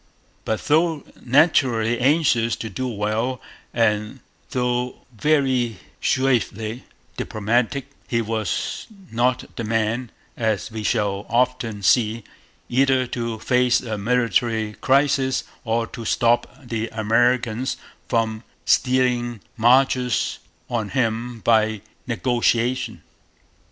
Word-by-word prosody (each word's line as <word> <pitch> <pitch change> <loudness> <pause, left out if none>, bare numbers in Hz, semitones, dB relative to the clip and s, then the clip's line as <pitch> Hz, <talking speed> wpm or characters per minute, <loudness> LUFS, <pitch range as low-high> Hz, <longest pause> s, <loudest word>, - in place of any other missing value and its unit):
But, 110 - -1
though 160 0 +2 0.2
naturally 125 -4 +3
anxious 130 -4 +3
to 110 - -6
do 130 +7 -3
well, 110 +3 -1 0.3
and 105 -2 0 0.3
though 125 0 -2
very 130 -5 +1 0.2
suavely 120 -3 0 0.3
diplomatic, 120 +5 0 0.2
he 115 - 0
was 110 -2 -2 0.2
not 125 +2 0
the 115 - -2
man, 115 +2 -1 0.3
as 110 -3 -1
we 110 0 -5
shall 105 -2 -1
often 120 -3 0
see, 110 +2 +3 0.4
either 130 0 +3
to 115 -2 -2
face 125 +2 +2
a 110 -3 -4
military 115 -1 +1
crisis 135 -1 +2 0.2
or 115 0 +1
to 115 - -8
stop 120 +2 +2 0.2
the 115 -1 -2
Americans 115 +2 +1 0.3
from 110 -2 0 0.2
stealing 125 -2 +2 0.2
marches 125 +1 +3 0.3
on 110 -4 -2
him 115 -2 -1
by 110 -2 +2 0.3
negotiation. 120 0 0
120 Hz, 100 wpm, -22 LUFS, 110-125 Hz, 0.4 s, naturally